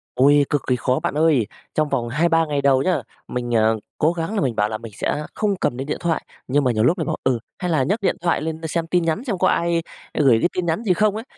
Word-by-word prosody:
Ôi, 140 Hz, +2 st, +5 dB
cực 145 Hz, -, +1 dB
kỳ 125 Hz, -, +3 dB
khó 125 Hz, +1 st, 0 dB
bạn -, -, -2 dB
ơi! 150 Hz, -9 st, +3 dB, 0.3 s
Trong 155 Hz, -1 st, +1 dB
vòng 120 Hz, -1 st, -1 dB
2-3 165 Hz, +4 st, +2 dB
ngày 145 Hz, -2 st, -1 dB
đầu 135 Hz, -1 st, +4 dB
nhá, 185 Hz, +4 st, +1 dB, 0.3 s
mình, 120 Hz, -1 st, -2 dB
à, 110 Hz, 0 st, +4 dB, 0.3 s
cố 155 Hz, +3 st, +2 dB
gắng 170 Hz, +5 st, -3 dB
là 205 Hz, -, +1 dB
mình 125 Hz, -7 st, 0 dB
bảo 105 Hz, 0 st, +1 dB
là 110 Hz, -, -3 dB
mình 115 Hz, -1 st, -10 dB
sẽ 150 Hz, -, -2 dB
không 205 Hz, -2 st, 0 dB
cầm 120 Hz, -, 0 dB
đến 135 Hz, +2 st, -4 dB
điện 150 Hz, -, -2 dB
thoại, 170 Hz, -2 st, -1 dB, 0.2 s
nhưng 145 Hz, +3 st, +2 dB
mà 125 Hz, -, +2 dB
nhiều 110 Hz, -1 st, +1 dB
lúc 170 Hz, +9 st, +3 dB
lại 160 Hz, -, -2 dB
bảo, -, -, -1 dB
ừ, 125 Hz, -3 st, +1 dB, 0.2 s
hay 180 Hz, -2 st, -2 dB
là 145 Hz, -5 st, +2 dB
nhấc 205 Hz, -, 0 dB
điện -, -, +1 dB
thoại 170 Hz, -4 st, +1 dB
lên 160 Hz, +1 st, -4 dB
đ -, -, -6 dB
xem 165 Hz, +1 st, -1 dB
tin 175 Hz, 0 st, +1 dB
nhắn 165 Hz, +9 st, -1 dB
xem 215 Hz, -9 st, -2 dB
có 185 Hz, -, +2 dB
ai 170 Hz, -1 st, +1 dB, 0.4 s
gửi 130 Hz, -6 st, +5 dB
đến -, -, +3 dB
tin 180 Hz, -, -1 dB
nhắn 170 Hz, +8 st, -1 dB
gì 185 Hz, -4 st, +3 dB
không 210 Hz, +2 st, +2 dB
ấy. 220 Hz, -, -4 dB
155 Hz, 285 wpm, -21 LUFS, 130-170 Hz, 0.4 s, Ôi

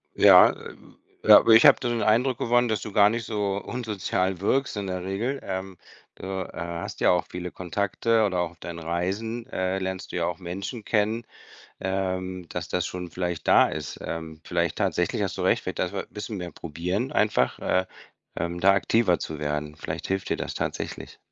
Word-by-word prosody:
Ja, -, -, +8 dB
äh, -, -, -10 dB, 0.5 s
ja, -, -, +10 dB
aber -, -, +3 dB
ich 110 Hz, +4 st, +8 dB
habe 145 Hz, -, +8 dB
da 120 Hz, -, -2 dB
den 120 Hz, -1 st, -1 dB
Eindruck 120 Hz, +4 st, +2 dB
gewonnen, 120 Hz, +1 st, +2 dB
dass 110 Hz, -3 st, -1 dB
du 105 Hz, -, -6 dB
gar 100 Hz, 0 st, +6 dB
nicht 115 Hz, 0 st, -3 dB
so 100 Hz, -2 st, -1 dB
unsozial 100 Hz, -5 st, -2 dB
wirkst 130 Hz, +5 st, 0 dB
in 100 Hz, -1 st, -3 dB
der 90 Hz, -1 st, -3 dB
Regel, 110 Hz, +9 st, -2 dB
ähm, 95 Hz, 0 st, -5 dB, 0.4 s
öh, 95 Hz, 0 st, -3 dB
äh, -, -, -10 dB
hast 85 Hz, 0 st, -5 dB
ja -, -, +5 dB
auch 90 Hz, -, +1 dB
viele 90 Hz, 0 st, -5 dB
Kontakte 100 Hz, +5 st, 0 dB
oder 95 Hz, -3 st, 0 dB
auch 85 Hz, -1 st, -1 dB
auf 85 Hz, -, -22 dB
deinen 85 Hz, -1 st, -7 dB
Reisen, 95 Hz, +8 st, -3 dB
äh, 95 Hz, -4 st, -1 dB
lernst 95 Hz, 0 st, -4 dB
du -, -, -6 dB
ja 85 Hz, -, +1 dB
auch 85 Hz, -1 st, -3 dB
Menschen 95 Hz, +6 st, -6 dB
kennen, 110 Hz, +2 st, +1 dB, 0.6 s
ähm 95 Hz, -2 st, -3 dB
dass 90 Hz, -, -4 dB
das 90 Hz, -1 st, -1 dB
schon 90 Hz, -1 st, -5 dB
vielleicht 85 Hz, -2 st, -4 dB
da -, -, +6 dB
ist 75 Hz, -2 st, -6 dB
ähm, 80 Hz, -1 st, -6 dB
vielleicht 85 Hz, -2 st, -1 dB
tatsächlich -, -, 0 dB
hast -, -, -3 dB
du -, -, -2 dB
recht, -, -, +2 dB
vielleicht -, -, -5 dB
dafür, 95 Hz, +2 st, -2 dB
bisschen 105 Hz, 0 st, -6 dB
mehr 90 Hz, -1 st, -6 dB
probieren 90 Hz, -, -3 dB
einfach, 105 Hz, -, +1 dB
äh, 95 Hz, 0 st, +1 dB, 0.5 s
ähm, 85 Hz, 0 st, -2 dB
da 95 Hz, +2 st, +5 dB
aktiver 100 Hz, -2 st, +2 dB
zu 80 Hz, -1 st, -5 dB
werden. 75 Hz, 0 st, -3 dB
Vielleicht -, -, -5 dB
hilft 95 Hz, 0 st, -2 dB
dir -, -, 0 dB
das -, -, -4 dB
tatsächlich. -, -, -5 dB
95 Hz, 195 wpm, -26 LUFS, 85-105 Hz, 0.6 s, ja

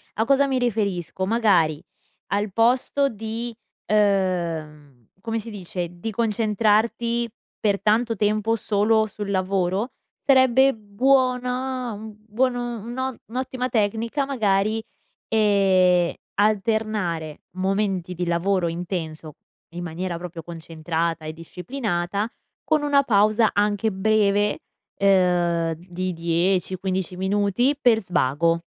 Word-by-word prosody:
A 220 Hz, -, +1 dB
cosa 275 Hz, +2 st, +4 dB
mi 265 Hz, -2 st, 0 dB
riferisco? 200 Hz, -6 st, -1 dB
Magari 185 Hz, -8 st, +2 dB, 0.4 s
al 205 Hz, 0 st, -1 dB
posto 250 Hz, +6 st, +2 dB
di, 225 Hz, +2 st, -5 dB, 0.3 s
uhm, 170 Hz, -, 0 dB
come 225 Hz, +1 st, -2 dB
si 225 Hz, +1 st, -8 dB
dice, 180 Hz, -3 st, -5 dB
di 175 Hz, +6 st, -6 dB
concentrarti 225 Hz, +2 st, +1 dB, 0.3 s
per 200 Hz, -2 st, +1 dB
tanto 225 Hz, +2 st, +2 dB
tempo 215 Hz, +2 st, +1 dB
solo 215 Hz, +1 st, +2 dB
sul 205 Hz, -1 st, -6 dB
lavoro, 190 Hz, +3 st, 0 dB, 0.3 s
sarebbe 265 Hz, 0 st, +4 dB
buona 250 Hz, +2 st, 0 dB
uhm, 215 Hz, +1 st, -9 dB
buon 245 Hz, +4 st, +1 dB
un 240 Hz, -3 st, -4 dB
un'o 260 Hz, +1 st, -3 dB
un'ottima 255 Hz, +1 st, -3 dB
tecnica 230 Hz, +5 st, 0 dB
magari, 220 Hz, -4 st, +1 dB, 0.5 s
ehm, 190 Hz, -5 st, +3 dB, 0.3 s
alternare 210 Hz, -7 st, 0 dB, 0.2 s
momenti 190 Hz, -2 st, -1 dB
di 180 Hz, 0 st, -3 dB
lavoro 175 Hz, +1 st, +1 dB
intenso 165 Hz, -3 st, -5 dB, 0.4 s
in 175 Hz, 0 st, -5 dB
maniera 175 Hz, +1 st, -4 dB
proprio 175 Hz, -1 st, -7 dB
concentrata 165 Hz, 0 st, -3 dB
e 155 Hz, -, -5 dB
disciplinata 185 Hz, -, -3 dB, 0.3 s
con 310 Hz, -1 st, +2 dB
una 285 Hz, -1 st, +3 dB
pausa 215 Hz, -2 st, +3 dB
anche 205 Hz, +1 st, +1 dB
breve, 205 Hz, +1 st, +2 dB, 0.4 s
ehm, 175 Hz, -4 st, +2 dB
di 180 Hz, +2 st, -5 dB
10-15 180 Hz, +2 st, -1 dB
minuti 205 Hz, +8 st, +1 dB
per 240 Hz, -5 st, +4 dB
svago, 170 Hz, -2 st, +1 dB
205 Hz, 110 wpm, -23 LUFS, 180-230 Hz, 0.5 s, cosa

